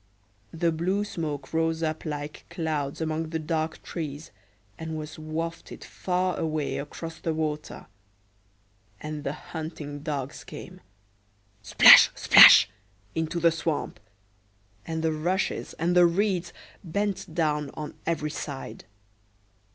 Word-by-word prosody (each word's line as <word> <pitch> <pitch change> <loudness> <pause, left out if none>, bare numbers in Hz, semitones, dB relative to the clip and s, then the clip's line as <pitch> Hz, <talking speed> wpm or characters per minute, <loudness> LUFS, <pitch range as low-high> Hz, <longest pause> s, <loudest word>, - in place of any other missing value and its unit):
The 165 0 0
blue 185 +6 -1
smoke 150 -8 -5
rose 165 0 0
up 155 +1 -3
like 150 -1 -6
clouds 160 -4 -3
among 160 0 -2
the 160 - -2
dark 160 0 -3
trees, 155 -2 -6 0.5
and 160 -1 -5
was 155 0 -8
wafted 165 +2 -6
far 185 0 -2
away 155 -2 -2
across 160 +3 -7
the 165 -1 -2
water; 155 -1 -4 1.1
and 150 -1 -6
the 140 - -2
hunting 155 -3 -7
dogs 140 -3 -5
came—splash, 100 +1 +3
splash!—into 100 - +5
the 170 0 +4
swamp, 160 -8 -3 0.9
and 160 -1 -3
the 160 -1 +1
rushes 175 +5 -2
and 170 +2 0
the 175 -1 +7
reeds 180 -1 0 0.3
bent 195 -1 -3
down 150 -3 0
on 150 -1 -6
every 150 -2 -1
side. 135 -10 -7
155 Hz, 115 wpm, -26 LUFS, 145-165 Hz, 1.1 s, the